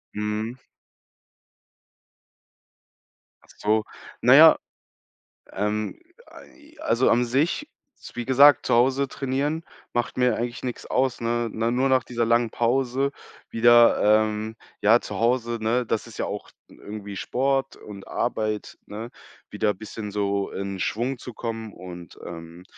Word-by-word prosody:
Mhm. 105 +4 -3 2.8
Ach - - -25
so, 110 +1 +1 0.4
na - - +7
ja, - - +8 0.9
ähm, 105 - -2 0.3
ei 310 0 -17
also 115 +3 +2
an 125 +1 +3
sich, 150 - 0 0.3
s - - -13
wie 120 - -4
gesagt, 140 +3 +6
zu - - +1
Hause 130 +3 +3
trainieren 140 +5 -2 0.3
macht 120 0 -2
mir 125 -2 +3
eigentlich 120 +2 -4
nix 125 -2 -5
aus, 130 -2 0
ne? 115 0 -1
Ne, 115 +2 -1
nur 130 +2 +1
nach 130 -1 +3
dieser 120 -1 -2
langen 115 0 +2
Pause 130 +3 0 0.4
wieder, 120 +1 +5 0.2
ähm 110 +1 -4 0.3
ja, 110 +3 +5
zu - - -6
Hause, 120 0 +1
ne, 120 +3 +1
das - - -2
ist - - -12
ja - - -1
auch - - -6 0.2
n - - -18
irgendwie 105 -1 -8
Sport 135 +6 -1
und 100 -2 -11
Arbeit, 110 -3 -2
ne, 110 +3 -7 0.4
wieder 105 -1 0
bisschen 105 +1 -7
so 100 -1 -1
in 100 0 -5
Schwung 120 +7 -1
zu 125 - -9
kommen 115 -1 -5
und, 90 -1 -11
ähm 85 +1 -9
115 Hz, 140 wpm, -24 LUFS, 105-130 Hz, 2.8 s, ja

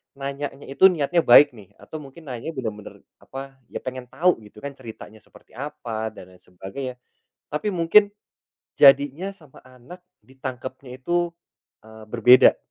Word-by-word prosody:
nanyanya 140 0 -6
itu 140 +8 +6
niatnya 170 +1 0
baik 145 +4 +8
nih, 100 -4 -15
atau - - -12
mungkin 140 +3 -14
nanya 125 +5 -5
bener-bener 110 -8 -7 0.2
apa, 135 0 -10 0.2
ya - - -5
pengen 130 0 -6
tahu 175 -9 +1
gitu 105 0 -15
kan 140 - -4
ceritanya 110 -4 -12
seperti - - -21
apa 115 -5 -5
dan 90 0 -14
lain 90 - -19
sebagainya, 95 +9 -8 0.5
tapi 155 +8 -2
mungkin 190 +3 +4 0.6
jadinya 145 +6 +4
sama 165 -9 -16
anak 130 +8 -15 0.2
ditangkapnya 130 0 -8
itu, 175 +5 -1 0.6
eee, 110 0 -13
berbeda 125 +2 +6
135 Hz, 140 wpm, -23 LUFS, 120-150 Hz, 0.6 s, baik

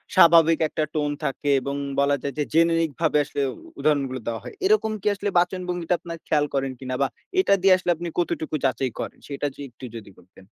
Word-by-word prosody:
স্বাভাবিক 165 -2 +7
একটা 155 - -2
টোন 150 -1 0
থাকে 140 +1 -2
এবং 140 +2 -3 0.2
বলা 140 0 +3
যায় 140 - -3
যে - - +3
জেনেরিক 165 -1 +3
ভাবে 155 -2 +3
আসলে 145 0 -4 0.4
উদাহরণগুলো 140 -4 +1
দেওয়া 115 -1 -3
হয়। - - -8
এরকম 405 - +3
কি - - -3
আসলে 200 0 -2
বাচনভঙ্গিটা 180 -1 -1
আপনার 170 -1 -7
খেয়াল 150 -1 +2
করেন 135 -1 0
কিনা? 130 -1 -4
বা 135 - +3 0.3
এটা 375 - +4
দিয়ে 190 0 +6
আসলে 180 -1 0
আপনি 170 +2 -5
কতটুকু 160 -2 -1
যাচাই 130 0 0
করেন? - - -5
সেটা 145 0 -2
য - - -24
একটু 120 +2 -11
যদি 110 -3 -9
বলতেন? 90 +2 -19
155 Hz, 200 wpm, -24 LUFS, 135-175 Hz, 0.4 s, স্বাভাবিক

